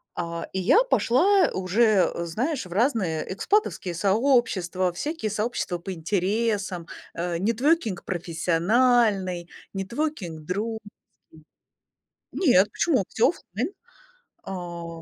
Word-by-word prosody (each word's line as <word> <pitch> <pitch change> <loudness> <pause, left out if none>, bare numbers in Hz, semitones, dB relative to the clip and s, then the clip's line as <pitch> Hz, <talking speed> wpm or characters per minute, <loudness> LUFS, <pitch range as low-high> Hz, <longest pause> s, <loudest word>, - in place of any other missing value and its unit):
А, 170 -1 -4
и 190 - -1
я 300 - +5
пошла 390 - +3
уже, 195 +2 +3
э, 170 - -4
знаешь, 250 - -2
в 175 - -9
разные 195 - 0
экспатовские 295 - 0
сообщества, 190 -3 +1
всякие 295 - -3
сообщества 210 -4 -2
по 185 +3 -6
интересам. 195 +1 -1 0.3
А, 170 0 -2
networking 230 - +1
профессиональный, 185 +2 +1 0.3
networking 200 - -3
дру 205 +8 -3
ж 205 - -12 1.5
кий 350 - +3
Нет, 190 +3 +5
почему? 275 - +1
Всё 225 - +3
оффлайн. 255 - -4 0.7
А, 170 -3 -7
195 Hz, 110 wpm, -25 LUFS, 175-240 Hz, 1.5 s, я